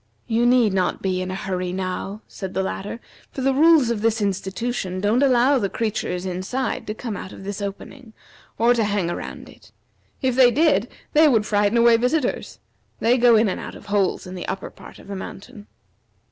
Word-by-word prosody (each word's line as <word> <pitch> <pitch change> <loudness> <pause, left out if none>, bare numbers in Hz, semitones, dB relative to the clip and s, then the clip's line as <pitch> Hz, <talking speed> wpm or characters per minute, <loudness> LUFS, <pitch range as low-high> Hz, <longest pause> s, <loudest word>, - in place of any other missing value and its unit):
"You 235 +1 +1
need 240 -5 +4
not 185 -2 -1
be 185 -1 0
in 185 - -4
a 185 - -3
hurry 185 -2 -3
now," 190 +3 -4
said 190 -2 -7
the 190 - +1
latter, 200 +4 -5 0.3
"for 270 - -5
the 270 +1 +2
rules 300 -3 +5
of 220 -3 -2
this 225 0 +1
institution 195 0 -2
don't 210 +6 +2
allow 260 0 +4
the 200 -4 -1
creatures 200 -5 -2
inside 190 +8 -3
to 215 - -4
come 225 -2 -5
out 185 - -7
of - - -11
this 200 +1 -5
opening, 220 +4 -7 0.4
or 235 +2 +4
to 235 -2 +1
hang 200 -4 0
around - - -7
it. - - -18 0.5
If 260 -3 0
they 255 -1 +7
did, 255 - +2 0.2
they 310 +1 +6
would 225 -7 +3
frighten 205 +2 +2
away 235 0 +6
visitors. 250 +3 -1 0.4
They 235 +2 +3
go 240 -1 +6
in 220 0 +4
and 190 - -2
out - - -8
of - - -13
holes 200 -2 0
in 180 - -8
the 180 - -6
upper 190 0 -5
part - - -14
of - - -15
the 200 - -5
mountain." 205 +3 -9
215 Hz, 200 wpm, -22 LUFS, 190-245 Hz, 0.5 s, they